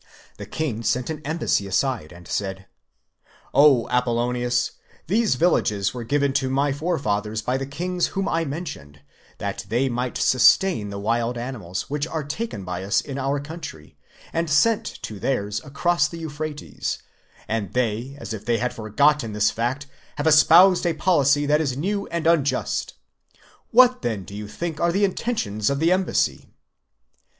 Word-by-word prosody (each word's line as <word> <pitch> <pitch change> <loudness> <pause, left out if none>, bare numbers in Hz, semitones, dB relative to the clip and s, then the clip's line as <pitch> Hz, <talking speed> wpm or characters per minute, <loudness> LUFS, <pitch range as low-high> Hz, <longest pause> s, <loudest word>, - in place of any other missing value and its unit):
The - - -8
king 135 -8 -3
sent 120 +3 0
the 155 -1 -5
embassy 150 -9 0
aside, 110 - -1
and 85 -1 -13
said: 95 -2 -3 0.9
"QO 140 -5 +5
Apollonius, 120 0 0 0.3
these 215 - +2
villages 105 - +1
were 125 -2 -5
given 140 +3 +1
to 130 - -2
my 135 +1 +1
forefathers 110 -9 -1
by 125 - 0
the 135 0 -4
kings 175 +5 -1
whom 195 -1 -2
I 165 0 +1
mentioned, 135 - -7 0.4
that - - -4
_ - - -5
they 120 +6 +1
might 125 +1 -2
sustain 130 - +4
the 100 - -6
wild 115 +3 -1
animals, 110 -8 -5
which 145 +2 -2
are 160 -2 -3
taken 145 - -5
by 90 0 -4
us 100 +3 +2
in 140 -1 -5
our 135 +1 0
country 145 - -9 0.4
and 165 0 -1
sent 210 +9 +3 0.2
to 105 -2 -6
theirs 105 -5 -1
across 170 +5 +1
the 170 - -8
Euphrates, 155 -2 -4 0.5
and 110 -3 -2
they, 125 +2 -1
as 125 - -6
if 105 -2 -6
they 120 0 +1
had 125 +2 -1
forgotten 115 +2 +1
this 105 0 +2
fact, 125 +5 -2 0.3
have 145 - -3
espoused 170 +4 +7
a 170 - +1
policy 145 -4 +3
that 150 +2 +3
is 135 -4 -1
new 200 +6 -2
and 170 -1 -3
unjust: 160 -4 +1 0.7
What 250 +1 +5
then 110 -6 -2
do 100 - -12
you 105 0 -6
think 165 +8 -5
are 170 0 +3
the 200 +3 +3
intentions 140 - -1
of 140 - 0
the 165 +4 +2
embassy? 185 0 0
135 Hz, 165 wpm, -23 LUFS, 110-160 Hz, 0.9 s, espoused